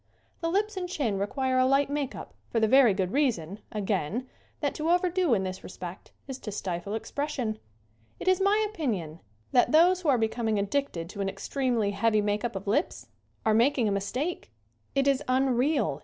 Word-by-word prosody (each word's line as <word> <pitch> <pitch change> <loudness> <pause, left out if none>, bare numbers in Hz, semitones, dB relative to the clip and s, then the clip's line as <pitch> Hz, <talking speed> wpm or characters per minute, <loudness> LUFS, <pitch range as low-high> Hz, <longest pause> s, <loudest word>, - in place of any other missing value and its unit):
The 330 - -1
lips 410 +3 0
and 360 -1 -3
chin 235 - -1
require 260 +5 0
a 255 - +5
light 275 +1 +3
make 285 -1 -2
up - - -9 0.2
for 230 - +1
the 220 - +3
very 260 -1 +6
good 190 -1 -1
reason, 215 - 0
again, 210 - -2 0.3
that 285 -2 -1
to 310 +2 -2
overdo 355 -5 +3
in 190 - 0
this 185 0 -5
respect 180 0 -9 0.2
is 265 -1 -6
to 210 - -6
stifle 195 0 -3
expression. 250 -3 -3 0.6
It - - -7
is 370 0 +4
my 415 +2 +3
opinion 210 - -3 0.3
that 245 - +4
those 350 +4 +5
who 325 - 0
are 265 - +5
becoming 225 -1 0
addicted 200 -4 -1
to 200 0 -6
an 195 - 0
extremely 230 +1 -1
heavy 215 +2 +2
make 205 0 0
up 235 -3 -2
of 195 - -5
lips 235 - -1 0.4
are 220 - +4
mak 240 +7 +3
ing 235 -4 +2
a - - +1
mistake. 250 - -2 0.5
It 275 0 +2
is 275 0 +3
unreal. 255 - +1
245 Hz, 190 wpm, -28 LUFS, 200-290 Hz, 0.6 s, very